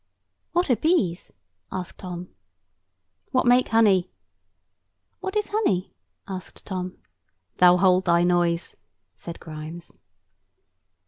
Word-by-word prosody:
"What 350 Hz, -5 st, +2 dB
are -, -, +5 dB
bees?" 215 Hz, -, 0 dB, 0.4 s
asked 185 Hz, -2 st, -6 dB
Tom. 180 Hz, -1 st, -7 dB, 1.0 s
"What 255 Hz, -, +1 dB
make 245 Hz, +1 st, +5 dB
honey." 210 Hz, -5 st, +4 dB, 1.1 s
"What 380 Hz, +2 st, -5 dB
is 420 Hz, -1 st, 0 dB
honey?" 305 Hz, -, 0 dB, 0.3 s
asked 185 Hz, -2 st, -7 dB
Tom. 185 Hz, -2 st, -4 dB, 0.6 s
"Thou 180 Hz, 0 st, +7 dB
hold 185 Hz, 0 st, +4 dB
thy 170 Hz, -1 st, +4 dB
noise," 175 Hz, -1 st, +1 dB, 0.4 s
said 170 Hz, -1 st, -8 dB
Grimes. 160 Hz, +2 st, -8 dB
185 Hz, 105 wpm, -25 LUFS, 175-230 Hz, 1.1 s, Thou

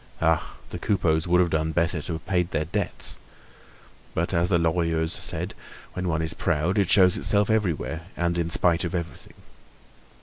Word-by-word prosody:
Ah! 80 Hz, -1 st, +1 dB, 0.2 s
the -, -, -5 dB
Coupeaus 85 Hz, -5 st, +1 dB
would 90 Hz, +1 st, +4 dB
have 85 Hz, -2 st, +1 dB
done 80 Hz, 0 st, 0 dB
better 85 Hz, -1 st, +1 dB
to 85 Hz, -, -5 dB
have 80 Hz, -, -6 dB
paid 90 Hz, -2 st, +1 dB
their 80 Hz, -, -1 dB
debts. 90 Hz, +2 st, -2 dB, 1.0 s
But 85 Hz, +3 st, -1 dB
as 85 Hz, 0 st, +2 dB
the 90 Hz, -, +4 dB
Lorilleuxs 80 Hz, -1 st, 0 dB
said, -, -, -3 dB, 0.4 s
when 90 Hz, 0 st, -3 dB
one 80 Hz, -1 st, 0 dB
is 80 Hz, -, -1 dB
proud 85 Hz, +5 st, 0 dB
it 95 Hz, -3 st, +2 dB
shows 95 Hz, -2 st, +5 dB
itself 105 Hz, +1 st, +3 dB
everywhere 85 Hz, -5 st, -1 dB
and 85 Hz, 0 st, 0 dB
in 85 Hz, -1 st, -1 dB
spite 85 Hz, 0 st, +2 dB
of 85 Hz, 0 st, -3 dB
everything. 85 Hz, -2 st, -6 dB
85 Hz, 175 wpm, -25 LUFS, 80-90 Hz, 1.0 s, shows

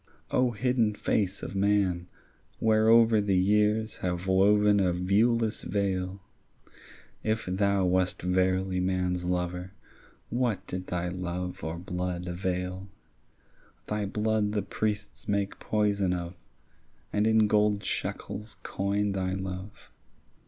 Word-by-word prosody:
O 125 Hz, 0 st, +3 dB
hidden 120 Hz, -2 st, +1 dB
face 100 Hz, -2 st, -1 dB
of -, -, -5 dB
man, 95 Hz, -3 st, +1 dB, 0.5 s
whereover 110 Hz, 0 st, +5 dB
The 100 Hz, -2 st, +2 dB
years 105 Hz, +3 st, +2 dB
have 90 Hz, 0 st, -3 dB
woven 100 Hz, +2 st, +4 dB
a 95 Hz, -2 st, +3 dB
viewless 110 Hz, +5 st, +2 dB
veil, 95 Hz, -1 st, -2 dB, 1.0 s
If 110 Hz, +1 st, 0 dB
thou 100 Hz, +1 st, +1 dB
wast 90 Hz, 0 st, +1 dB
verily 95 Hz, 0 st, +1 dB
man's 90 Hz, -1 st, 0 dB
lover, 90 Hz, +1 st, -2 dB, 0.6 s
What 115 Hz, -5 st, 0 dB
did 90 Hz, 0 st, -5 dB
thy 90 Hz, 0 st, -2 dB
love 90 Hz, 0 st, -4 dB
or 80 Hz, +1 st, -3 dB
blood 90 Hz, 0 st, -3 dB
avail? 90 Hz, +1 st, -3 dB, 1.0 s
Thy 105 Hz, -1 st, -2 dB
blood 105 Hz, 0 st, 0 dB
the 105 Hz, -, 0 dB
priests 105 Hz, -1 st, -3 dB
make 100 Hz, -1 st, -1 dB
poison 100 Hz, -3 st, +1 dB
of, 85 Hz, -1 st, -4 dB, 0.8 s
And 105 Hz, +1 st, +2 dB
in 110 Hz, -1 st, +5 dB
gold 105 Hz, -1 st, +2 dB
shekels 105 Hz, +1 st, -4 dB
coin 100 Hz, +1 st, -1 dB
thy 95 Hz, -1 st, -1 dB
love. 95 Hz, +1 st, -7 dB
95 Hz, 115 wpm, -28 LUFS, 90-105 Hz, 1.0 s, whereover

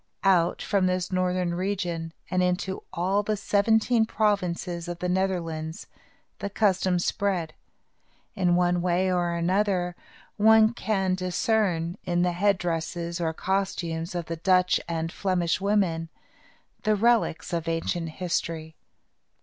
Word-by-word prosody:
Out 180 Hz, -3 st, +3 dB
from 195 Hz, -3 st, +1 dB
this 185 Hz, 0 st, -1 dB
northern 180 Hz, -1 st, 0 dB
region, 175 Hz, -3 st, -2 dB, 0.2 s
and 185 Hz, 0 st, +2 dB
into 180 Hz, +1 st, -1 dB
all 190 Hz, +4 st, +1 dB
the 210 Hz, +1 st, -1 dB
seventeen 220 Hz, +3 st, +2 dB
provinces 180 Hz, -5 st, -1 dB
of 175 Hz, -1 st, -4 dB
the 180 Hz, -, -3 dB
Netherlands, 170 Hz, -4 st, -2 dB, 0.5 s
the 200 Hz, -, -3 dB
custom 190 Hz, -3 st, +2 dB
spread. 175 Hz, -3 st, -1 dB, 0.8 s
In 180 Hz, -4 st, +2 dB
one 175 Hz, 0 st, +2 dB
way 180 Hz, +1 st, +1 dB
or 175 Hz, -1 st, 0 dB
another, 180 Hz, 0 st, 0 dB, 0.4 s
one 220 Hz, +1 st, +6 dB
can 195 Hz, -4 st, 0 dB
discern, 185 Hz, -2 st, 0 dB
in 175 Hz, 0 st, +1 dB
the 180 Hz, -, +2 dB
headdresses 175 Hz, -2 st, -1 dB
or 165 Hz, -1 st, 0 dB
costumes 175 Hz, -2 st, -2 dB
of 175 Hz, -2 st, -2 dB
the 165 Hz, +1 st, -5 dB
Dutch 180 Hz, +1 st, +3 dB
and 165 Hz, 0 st, -2 dB
Flemish 180 Hz, -3 st, 0 dB
women, 190 Hz, -5 st, +1 dB, 0.7 s
the 215 Hz, 0 st, +2 dB
relics 225 Hz, -6 st, +1 dB
of 170 Hz, -1 st, -2 dB
ancient 165 Hz, 0 st, -1 dB
history. 165 Hz, -2 st, -3 dB
180 Hz, 125 wpm, -26 LUFS, 170-195 Hz, 0.8 s, one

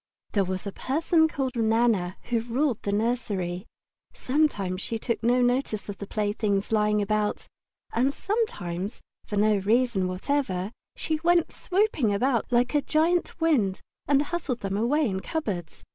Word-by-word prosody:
There 200 Hz, -, +2 dB
was 185 Hz, +1 st, -3 dB
a 200 Hz, -, -3 dB
person 320 Hz, -, +2 dB
called 270 Hz, -4 st, -3 dB
Nana 220 Hz, -5 st, +2 dB
who 235 Hz, -, +3 dB
ruled 245 Hz, +2 st, 0 dB
the 200 Hz, -, -2 dB
nursery. 200 Hz, -5 st, -1 dB, 0.5 s
Sometimes 210 Hz, -10 st, 0 dB
she 230 Hz, -, -2 dB
took 235 Hz, +1 st, -2 dB
no 245 Hz, +2 st, +3 dB
notice 245 Hz, -4 st, 0 dB
of 200 Hz, -, -5 dB
the 200 Hz, -, -6 dB
playthings 205 Hz, -1 st, -1 dB
lying 210 Hz, -1 st, +2 dB
about, 210 Hz, 0 st, -1 dB, 0.5 s
and 255 Hz, +4 st, +2 dB
sometimes, 210 Hz, -, -3 dB, 0.3 s
for 205 Hz, -, -3 dB
no 210 Hz, 0 st, +4 dB
reason 215 Hz, -1 st, +2 dB
whatever, 190 Hz, -1 st, -1 dB, 0.2 s
she 315 Hz, -1 st, -2 dB
went 345 Hz, -1 st, +3 dB
swooping 370 Hz, -, +1 dB
about 245 Hz, +2 st, +1 dB
like 245 Hz, +2 st, +2 dB
a 295 Hz, -, +3 dB
great 330 Hz, +4 st, +1 dB
wind 245 Hz, -, +2 dB, 0.3 s
and 280 Hz, 0 st, +4 dB
hustled 295 Hz, -6 st, -3 dB
them 195 Hz, 0 st, -2 dB
away 270 Hz, +9 st, +2 dB
in 190 Hz, -3 st, -2 dB
cupboards. 190 Hz, -, -4 dB
230 Hz, 150 wpm, -26 LUFS, 200-280 Hz, 0.5 s, no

